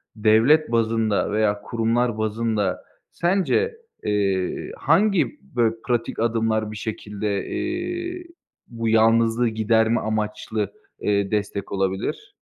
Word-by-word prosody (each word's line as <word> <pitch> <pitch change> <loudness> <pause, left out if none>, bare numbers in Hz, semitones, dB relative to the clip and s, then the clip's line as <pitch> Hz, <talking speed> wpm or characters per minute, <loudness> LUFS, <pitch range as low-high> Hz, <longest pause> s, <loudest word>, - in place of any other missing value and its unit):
devlet 115 +8 +4
bazında 115 -3 +1
veya 105 -1 +1
kurumlar 115 +1 0
bazında 110 -2 -1 0.3
sence, 195 - +1 0.3
eee, 100 -3 -1
hangi, 200 - +2 0.2
böyle, 115 -2 +2
pratik 120 -2 -1
adımlar 110 -1 0
bir 110 - -7
şekilde, 105 -1 -3
eee, 350 +1 -3 0.4
bu 115 -1 -3
yalnızlığı 115 +1 +4
giderme 110 +1 +2
amaçlı, 105 -1 -2 0.3
eee, 100 -1 0
destek 100 -1 -2
olabilir? 95 -1 -2
110 Hz, 100 wpm, -23 LUFS, 105-120 Hz, 0.4 s, devlet